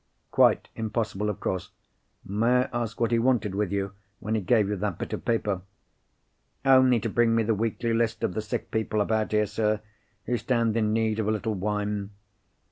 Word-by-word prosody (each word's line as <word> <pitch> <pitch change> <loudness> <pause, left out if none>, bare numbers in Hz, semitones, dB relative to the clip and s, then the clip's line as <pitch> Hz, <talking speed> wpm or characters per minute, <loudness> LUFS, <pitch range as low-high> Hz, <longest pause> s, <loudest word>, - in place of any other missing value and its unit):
"Quite - - +4
impossible, 110 -2 -2
of 105 - -4
course! 95 - -3 0.6
May 115 +5 +2
I - - -10
ask 115 -2 -3
what 115 -1 +1
he 115 - +3
wanted 115 -5 +1
with 100 -1 -1
you, 100 -1 -1 0.3
when 110 - -3
he 110 - +1
gave 105 +2 +3
you 105 - -1
that 100 -3 -2
bit - - -5
of - - -4
paper?" 105 -5 0 1.0
"Only 130 -2 +6
to 115 - -1
bring 115 +1 +2
me 115 - +3
the 110 +1 +1
weekly 115 +2 -1
list 115 0 0
of - - 0
the 110 - -2
sick 105 - -4
people 110 -1 0
about 110 +1 +1
here, 105 0 +3
sir, 105 +1 0 0.5
who 120 +1 0
stand 115 -1 +1
in 110 -2 +1
need 110 0 +1
of 110 - 0
a - - +2
little 110 +1 -1
wine. 105 0 -2
110 Hz, 200 wpm, -27 LUFS, 105-115 Hz, 1.0 s, Only